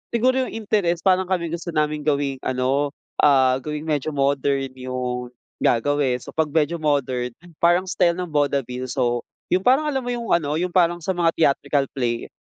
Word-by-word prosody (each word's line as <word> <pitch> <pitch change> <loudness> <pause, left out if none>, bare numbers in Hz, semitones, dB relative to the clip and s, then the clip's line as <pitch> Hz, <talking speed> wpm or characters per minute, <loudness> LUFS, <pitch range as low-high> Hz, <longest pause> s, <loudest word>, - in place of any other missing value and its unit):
siguro 255 +2 +2
yung - - -9
interest 200 -6 0
parang 190 -1 +3
kami 175 -3 -1
gusto 170 0 -5
naming 150 -1 0
gawing 140 -2 0
ano, 135 +3 0 0.3
ah, 130 -3 +5
gawing 150 +3 -5
medyo 155 -1 -1
modern 140 -1 +1
yung 125 -1 -4 0.3
gagawin. 130 0 +1
So, - - -10
'pag 160 -1 0
medyo 160 +1 +1
modern 130 -5 0 0.3
parang 175 +2 +4
style 175 -2 +2
ng 180 -2 -4
vaudeville, 135 -3 -1
so, 120 -2 -1 0.3
yung 185 +2 +2
parang 285 +4 +4
alam 265 -2 -2
mo 245 - -2
yung 235 -2 -5
ano, 150 -3 +2
yung 180 +2 -1
parang 175 -1 +2
sa 190 - 0
mga 170 -2 +1
theatrical 140 -2 +2
play 120 -3 -2
150 Hz, 175 wpm, -22 LUFS, 130-175 Hz, 0.3 s, ah